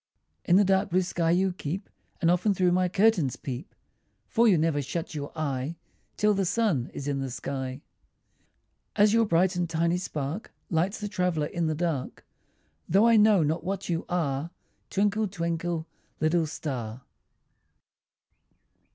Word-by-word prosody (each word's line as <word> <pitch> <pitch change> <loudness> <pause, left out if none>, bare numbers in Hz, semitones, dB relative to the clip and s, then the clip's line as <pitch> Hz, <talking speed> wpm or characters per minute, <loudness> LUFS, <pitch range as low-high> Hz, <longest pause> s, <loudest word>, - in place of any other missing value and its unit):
In 175 - +4
the 205 - +6
dark 190 +1 +2
blue 185 +2 +2
sky 170 -2 -1
you 185 +2 +2
keep, 180 +3 -5 0.3
And 170 -1 +4
often 185 +3 +2
through 180 -1 +3
my 180 0 +2
curtains 190 - +3
peep, 130 +4 -7 0.5
For 235 0 +3
you 195 -6 +5
never 155 -2 +1
shut 160 +5 -4
your 145 -2 -5
eye 140 0 -2 0.4
Till 210 0 +3
the 195 -1 +1
sun 180 - +1
is 140 - -6
in 140 -1 -1
the 135 -1 -3
sky. 130 +1 -5 1.1
As 210 0 +5
your 230 0 +4
bright 180 +1 +3
and 175 -1 -1
tiny 170 +1 +1
spark 155 +1 -4 0.2
Lights 180 +5 0
the 210 - -3
traveller 180 -6 0
in 170 +2 -2
the 155 - 0
dark, 160 -5 -3 0.6
Though 195 +6 +5
I 230 -1 +6
know 210 -4 +5
not 155 +3 -1
what 195 +1 -3
you 165 -1 0
are, 155 -3 -1 0.4
Twinkle, 205 +2 +1
twinkle, 170 -2 -2 0.3
little 160 +1 +2
star. 125 -6 -5
170 Hz, 155 wpm, -27 LUFS, 150-195 Hz, 1.1 s, the